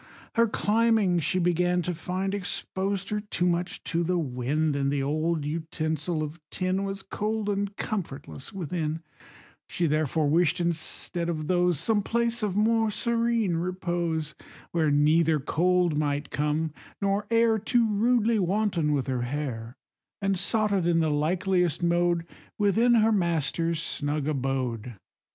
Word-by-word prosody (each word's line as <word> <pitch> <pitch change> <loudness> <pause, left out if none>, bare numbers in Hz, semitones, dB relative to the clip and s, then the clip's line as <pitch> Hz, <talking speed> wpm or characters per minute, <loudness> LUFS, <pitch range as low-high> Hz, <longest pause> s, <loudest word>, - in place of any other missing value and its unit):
Her 230 -1 +4
climbing, 215 -4 +2
she 165 +3 0
began 180 0 +2
to 180 - -2
find, 185 +4 -3
Exposed 195 0 -3
her 210 - -1
too 205 -4 -2
much 175 0 -1
to 170 0 -1
the 180 +2 0
wind, 145 +1 -1
And 140 0 0
the 140 -1 0
old 155 +2 0
utensil 155 0 -2
of 155 +3 -6
tin 185 +1 -1
Was 195 0 -5
cold 215 +1 -2
and 200 0 -2
comfortless 160 -9 -5
within: 165 -3 -3 0.7
She 175 - 0
therefore 155 0 +1
wish'd 165 +3 +3
instead 170 0 -1
of 155 -2 -2
those 180 -2 +2
Some 220 -2 +2
place 235 +2 0
of 205 -3 -1
more 225 +1 +3
serene 230 -3 0
repose, 175 -3 -2 0.4
Where 160 -3 +2
neither 155 +2 +3
cold 175 +3 +1
might 145 -1 -1
come, 150 +1 -1 0.3
nor 200 +1 0
air 230 -1 +3
Too 230 +2 +2
rudely 225 +1 +2
wanton 185 -5 +1
with 140 -3 0
her 130 -2 -2
hair, 125 -2 -4 0.4
And 195 -1 +1
sought 215 +3 +1
it 190 -4 +1
in 170 -1 +3
the 160 -1 +1
likeliest 175 +2 +1
mode 170 0 +2 0.3
Within 225 +4 +3
her 225 0 +4
master's 170 -3 +1
snug 145 -2 -1
abode. 130 -5 -2
175 Hz, 145 wpm, -27 LUFS, 155-200 Hz, 0.7 s, Her